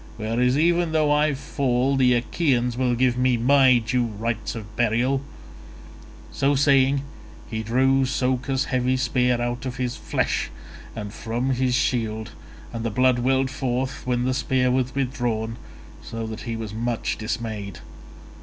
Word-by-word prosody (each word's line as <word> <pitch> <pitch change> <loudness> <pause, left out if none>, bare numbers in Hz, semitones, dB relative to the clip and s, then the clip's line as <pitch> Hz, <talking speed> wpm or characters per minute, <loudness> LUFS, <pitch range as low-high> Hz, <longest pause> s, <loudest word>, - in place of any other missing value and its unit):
Whereas 120 +4 +1
even 170 +1 +2
though 155 -2 +3
I 150 0 +3
fall 135 0 0
the 125 -2 +4
Achaeans 125 -1 0
will 125 -1 +1
give 125 0 +1
me 125 -1 +3
my 130 +1 +5
due 120 +1 0
rites 110 +1 -3
of 105 -1 -9
burial." 120 +4 +1 1.1
So 140 +1 +1
saying 135 0 +3 0.5
he 110 -1 -2
drew 130 +4 +2
Socus's 130 +1 0
heavy 130 -1 0
spear 125 -2 +1
out 120 +2 -3
of 125 - -5
his 125 -1 -2
flesh - - -1 0.5
and 105 -2 -6
from 120 +3 -2
his 125 -1 +1
shield, 110 -4 -1 0.4
and 115 -1 -4
the 115 - 0
blood 125 +2 +2
welled 130 +1 +1
forth 130 0 -2
when 125 -1 +1
the 130 - +1
spear 130 -1 +1
was 130 0 0
withdrawn 120 -4 -2 0.4
so 115 0 -6
that 110 0 -6
he 115 - -2
was 110 -2 -6
much 115 +1 -2
dismayed. 110 -3 -4
125 Hz, 150 wpm, -24 LUFS, 115-130 Hz, 1.1 s, my